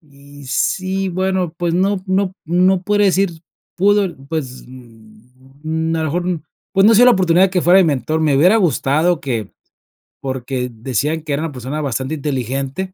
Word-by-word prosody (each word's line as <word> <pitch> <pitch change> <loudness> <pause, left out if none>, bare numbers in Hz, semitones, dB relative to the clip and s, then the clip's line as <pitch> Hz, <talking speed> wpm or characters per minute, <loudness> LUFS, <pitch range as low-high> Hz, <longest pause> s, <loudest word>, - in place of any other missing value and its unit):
y 145 -2 -16
sí, 190 +7 -1
bueno, 185 -1 -1
pues, 170 -1 -1
no 190 +1 +1
no 190 0 0
no 180 +3 +2
podría 205 +1 +2
decir, 195 0 +2 0.5
pudo, 200 -1 +2
pues, 135 -6 -5
mm, 130 +7 -7
a - - -1
lo 160 - -1
mejor, 175 +2 -2 0.3
pues, 195 +1 +4
no 225 - +6
se 215 - +5
dio 245 - +7
la 250 - +7
oportunidad 185 0 +3
que 180 -2 0
fuera 180 +3 +5
mi - - +4
mentor, 155 +1 -1
me 150 -3 +2
hubiera 180 +10 +5
gustado 165 -2 +1
que 120 - -4 0.7
porque 130 -1 -4
decían 130 +7 -2
que 150 -2 -4
era 140 - -1
una 165 - -3
persona 135 +3 -5
bastante 135 +1 -3
inteligente, 140 - -3
160 Hz, 170 wpm, -18 LUFS, 135-185 Hz, 0.7 s, dio